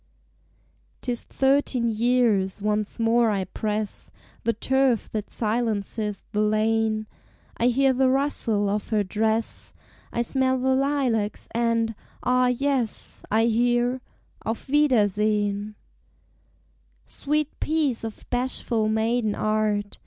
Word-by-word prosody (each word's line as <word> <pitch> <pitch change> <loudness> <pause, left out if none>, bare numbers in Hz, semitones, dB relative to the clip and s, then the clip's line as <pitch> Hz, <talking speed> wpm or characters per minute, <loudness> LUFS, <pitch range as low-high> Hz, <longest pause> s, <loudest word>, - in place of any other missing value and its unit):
'Tis 245 -2 -2
thirteen 265 -3 +1
years; 225 -4 +2
once 210 +2 -1
more 230 0 +3
I 200 -2 0
press 210 +2 -4 0.4
The 230 - +2
turf 265 +1 +1
that 210 -2 -4
silences 215 -2 -2
the 210 -1 0
lane; 215 0 +1 0.5
I 235 - +2
hear 265 +2 +3
the 260 0 +3
rustle 255 -6 +1
of 205 +1 -1
her 215 -2 +2
dress, 220 +3 -1 0.4
I 235 - 0
smell 260 +1 +2
the 260 +1 +1
lilacs, 260 -6 0
and 230 -1 +1 0.3
ah, 250 0 +3
yes, 250 -2 -1
I 220 +2 +3
hear, 240 +2 +1 0.4
"Auf 225 +1 -4
wiedersehen!" 210 -6 +2 1.3
Sweet 300 - -2
piece 300 -7 0
of 225 -1 -7
bashful 245 -3 0
maiden 220 0 +1
art! 215 -1 -1
230 Hz, 110 wpm, -25 LUFS, 215-250 Hz, 1.3 s, more